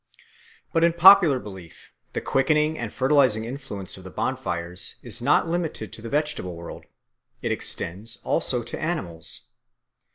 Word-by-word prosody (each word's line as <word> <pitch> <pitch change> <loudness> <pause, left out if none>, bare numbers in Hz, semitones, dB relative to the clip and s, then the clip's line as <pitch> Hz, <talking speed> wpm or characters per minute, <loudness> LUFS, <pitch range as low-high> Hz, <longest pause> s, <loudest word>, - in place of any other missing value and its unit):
But 165 -1 +3
in 170 0 +4
popular 175 -4 +8
belief 95 -7 -11 0.2
the - - -2
quickening 150 +3 +2
and 120 -7 -5
fertilising 130 -5 +3
influence 115 -8 -5
of 95 - -12
the 95 - -9
bonfires 85 +1 -3
is - - -2
not - - +3
limited 165 -10 -3
to - - -7
the 115 - -7
vegetable 145 - -2
world; 85 0 -9 0.6
it - - -1
extends 100 +7 -1
also 125 -2 0
to 120 - -7
animals. 95 - -3
120 Hz, 140 wpm, -24 LUFS, 95-155 Hz, 0.6 s, popular